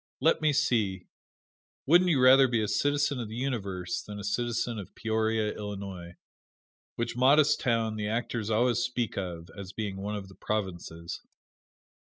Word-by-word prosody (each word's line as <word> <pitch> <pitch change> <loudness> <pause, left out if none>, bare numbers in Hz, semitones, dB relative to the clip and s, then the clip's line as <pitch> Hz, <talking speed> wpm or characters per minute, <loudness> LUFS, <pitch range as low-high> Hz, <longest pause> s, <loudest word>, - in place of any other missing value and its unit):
Let 160 - +3
me 155 -1 +3
see 110 -10 +1 0.8
wouldn't 175 +5 +5
you 150 -6 +3
rather 130 +1 +7
be 115 -3 +1
a - - -1
citizen 145 +4 +1
of 115 -3 -4
the 110 - -7
Universe 100 -9 -3
than 105 0 -8
a 100 - -7
citizen 115 +2 -1
of 100 - -10
Peoria, 110 -1 0
Illinois, 95 -4 -7 0.8
which 120 0 -3
modest 145 +4 +5
town 115 -3 0
the 105 -1 -2
actors 115 -1 -2
always 120 +2 +2
speak 120 -2 -2
of 85 -3 -5
as 100 -1 -8
being 100 -3 -4
one 100 +2 -4
of 100 -2 -6
the 95 - -14
provinces? 85 -6 -4
110 Hz, 160 wpm, -29 LUFS, 100-125 Hz, 0.8 s, rather